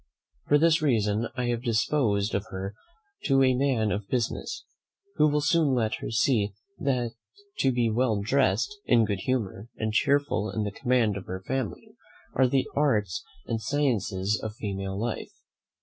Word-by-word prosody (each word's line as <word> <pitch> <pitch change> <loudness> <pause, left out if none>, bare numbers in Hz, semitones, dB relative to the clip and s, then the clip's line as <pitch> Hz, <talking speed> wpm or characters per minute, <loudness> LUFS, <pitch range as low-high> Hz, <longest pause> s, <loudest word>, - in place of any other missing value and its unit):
For 145 - +5
this 165 +2 +4
reason 110 -5 +1
I 125 -1 -1
have 120 -1 -1
disposed 110 -3 +1
of 100 +2 -1
her 95 +1 -5 0.5
to 135 -2 +4
a 130 -1 +4
man 125 -5 +1
of 100 -1 -3
business, 120 -1 -2 0.5
who 150 - +5
will 150 0 +1
soon 150 -3 +3
let 110 -3 +1
her - - -5
see 110 -2 +2 0.3
that 125 -4 0 0.5
to 135 - +3
be 120 -2 +1
well 115 -1 +1
dressed, 130 - +1
in 115 -2 +5
good 100 -3 -2
humour, 110 -2 -2
and 110 -1 -2
cheerful 140 -4 +2
in 110 - -2
the 105 - -2
command 120 -3 +1
of 95 - -8
her 95 +1 -5
family, 130 -5 -3 0.4
are 130 0 +4
the 130 +1 +1
arts 110 -11 +1 0.2
and 115 -1 -2
sciences 110 -8 0
of 110 -1 -5
female 95 -2 -4
life. 115 +1 -4
115 Hz, 165 wpm, -27 LUFS, 105-135 Hz, 0.5 s, For